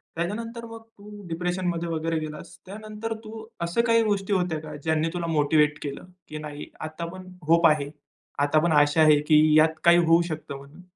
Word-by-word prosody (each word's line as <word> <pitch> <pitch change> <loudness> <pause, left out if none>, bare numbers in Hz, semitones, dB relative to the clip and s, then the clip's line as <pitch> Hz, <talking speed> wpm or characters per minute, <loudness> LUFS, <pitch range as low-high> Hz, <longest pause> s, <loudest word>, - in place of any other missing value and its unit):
त्याच्यानंतर 230 +7 -4
मग 225 0 -10
तू 210 -2 -14
डिप्रेशनमध्ये 175 0 -2
वगैरे 165 0 -1
गेलास. 155 -1 -8
त्यानंतर 215 +3 -6
तू 220 0 -9 0.2
अशा 170 +7 +1
काही 230 0 +4
गोष्टी 205 -2 -1
होत्या 180 -4 0
का 155 -1 -9
ज्यांनी 160 0 0
तुला 175 -1 -3
मोटिव्हेट 150 -1 +2
केलं, 140 +2 -6 0.2
की 155 - -7
नाही, 150 -1 -8
आता 155 +2 -6
पण 185 0 -11 0.2
होप 165 +1 +5
आहे, 150 -2 +1 0.5
आता 145 +2 +3
पण 170 - +2
आशा 145 +1 +4
आहे, 155 -1 +6
की 155 0 +4
यात 160 0 +3
काही 170 0 +6
होऊ 165 +1 +5
शकतं 155 -3 -6
म्हणून? 140 +5 -15
165 Hz, 180 wpm, -25 LUFS, 155-195 Hz, 0.5 s, आहे